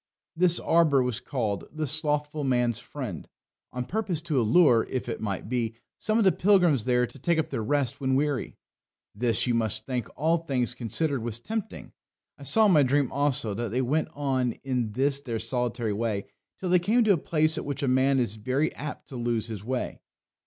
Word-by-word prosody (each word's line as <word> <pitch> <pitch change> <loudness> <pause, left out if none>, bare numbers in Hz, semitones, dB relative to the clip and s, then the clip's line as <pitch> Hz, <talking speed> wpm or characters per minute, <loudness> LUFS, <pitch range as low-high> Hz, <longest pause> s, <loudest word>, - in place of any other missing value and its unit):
This 175 0 +3
arbour 155 -5 +3
was 125 -3 -1
called 110 - -3
The 155 0 -3
Slothful 150 0 0
Man's 120 -3 +1
Friend, 120 - -7 0.4
on 125 0 -4
purpose 195 - -2
to 155 -6 0
allure, 120 0 +5
if 130 -2 -3
it 120 - -4
might 100 -2 -3
be, 115 -2 -2 0.2
some 215 +1 +1
of 230 - +3
the 190 - +5
pilgrims 180 - +3
there 125 -1 +2
to 135 - -13
take 170 +5 +1
up 160 - 0
their - - -3
rest 140 +3 -1
when 130 -1 +1
weary. 145 -2 -1 0.6
This, 115 0 +2
you 125 - +1
must 110 -1 -1
think, 125 -3 -3
all 160 +3 +2
things 130 -7 -1
considered, 125 +3 -1
was 115 0 -4
tempting. 190 - -5 0.4
I - - -20
saw 180 - +4
in 205 - +5
my 155 -4 +6
dream 140 0 +2
also 140 -5 +1
that 115 +2 -3
they 125 +5 0
went 150 +6 0
on 130 -4 0
in 125 -5 -2
this 140 +3 +2
their 120 -5 -3
solitary 120 -1 -2
way 105 -2 -2 0.3
till 185 - -4
they 180 - +5
came 220 +7 +2
to 210 -2 +5
a - - +1
place 155 +1 +1
at - - -5
which 140 0 -4
a - - +1
man 130 +2 +3
is 115 -4 -1
very 130 +8 0
apt 150 +2 -7
to 135 - -8
lose 120 -2 -1
his 105 -3 -6
way. 125 +2 -3
130 Hz, 200 wpm, -27 LUFS, 120-150 Hz, 0.6 s, my